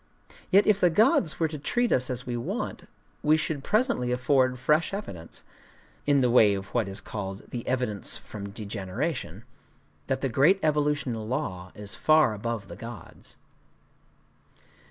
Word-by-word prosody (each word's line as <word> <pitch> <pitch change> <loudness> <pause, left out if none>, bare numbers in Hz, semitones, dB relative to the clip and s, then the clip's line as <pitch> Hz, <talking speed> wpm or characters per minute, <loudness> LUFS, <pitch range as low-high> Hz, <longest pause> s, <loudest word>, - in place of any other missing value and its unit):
Yet 200 +2 +5
if 210 -2 +4
the 180 - +5
gods 170 -3 +3
were 165 - +2
to 155 -1 -7
treat 240 - 0
us 125 +1 +2
as 125 0 -4
we 120 - -3
want, 120 - -4 0.3
we 155 +1 +4
should 155 -3 -2
presently 215 - +1
afford 130 0 +2
fresh 150 +9 +1
evidence,—in 140 - -4
the 125 - +3
way 110 -5 +6
of 95 0 -7
what 115 -5 +1
is 95 0 -3
called 95 -2 -6
"the 120 -2 -5
evidence 125 -6 0
from 100 -2 -8
degeneration,"—that 100 +5 -6
the 135 - +1
great 155 - +4
evolutional 145 -7 0
law 95 -9 -3
is 105 -1 -7
far 155 -6 +4
above 110 -1 -4
the 85 - -9
gods. 115 +3 -11
125 Hz, 145 wpm, -27 LUFS, 105-150 Hz, 0.3 s, way